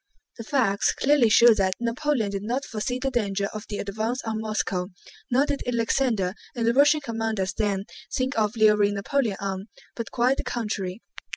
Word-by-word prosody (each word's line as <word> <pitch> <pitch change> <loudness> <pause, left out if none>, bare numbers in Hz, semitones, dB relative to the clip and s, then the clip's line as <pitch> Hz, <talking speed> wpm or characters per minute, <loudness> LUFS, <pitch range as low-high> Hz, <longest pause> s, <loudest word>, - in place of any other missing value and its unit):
The - - -4
facts 220 -5 +1
clearly 275 -4 +3
show 235 +2 +7
that 190 -3 0
Napoleon 235 -2 0
did 200 -1 -3
not 245 +6 -2
foresee 230 +3 -3
the 265 +1 -2
danger 200 -5 0
of 215 0 -7
the 205 - -3
advance 220 +5 -2
on 220 -1 -3
Moscow, 205 -4 -2 0.4
nor 260 +3 +3
did 285 -1 -2
Alexander 230 -5 +1 0.2
and 235 -2 -1
the 230 - +3
Russian 290 +3 +5
commanders 225 -6 -2
then 200 -2 -1 0.3
think 260 +2 -1
of 215 0 +1
luring 210 -2 +4
Napoleon 220 0 0
on, 195 0 -4 0.3
but 230 - -5
quite 250 +3 +2
the - - -3
contrary. 210 -4 -3
225 Hz, 175 wpm, -25 LUFS, 200-250 Hz, 0.4 s, show